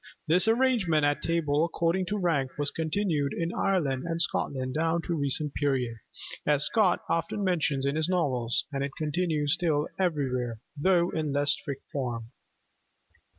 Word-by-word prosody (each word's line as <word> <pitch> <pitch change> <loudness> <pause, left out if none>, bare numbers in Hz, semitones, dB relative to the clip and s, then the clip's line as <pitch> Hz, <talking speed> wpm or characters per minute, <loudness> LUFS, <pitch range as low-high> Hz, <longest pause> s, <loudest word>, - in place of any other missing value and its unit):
This 175 +6 +3
arrangement 225 - +3
at 145 0 +1
table 160 -3 +1
according 170 +2 0
to 210 - -1
rank 155 -9 0
was 145 -1 0
continued 160 -3 0
in 170 +1 -2
Ireland 145 -9 0
and 165 0 -2
Scotland 130 -5 -1
down 165 +2 0
to 170 - -2
a - - 0
recent 145 0 0
period, 130 -5 0 0.5
as 145 -1 +2
Scott 205 -6 +3
often 165 +5 -1
mentions 155 -7 +1
in 140 +1 0
his 160 +2 +1
novels; 130 -10 +1
and 135 0 -1
it 140 -1 -4
continues 155 -1 0
still 160 -4 +1
everywhere, 130 -10 -1 0.2
though 175 +3 +2
in 155 -1 -2
a - - -2
less 145 +1 +2
strict 140 -2 -4
form. 120 -6 -4
155 Hz, 160 wpm, -28 LUFS, 140-170 Hz, 0.5 s, This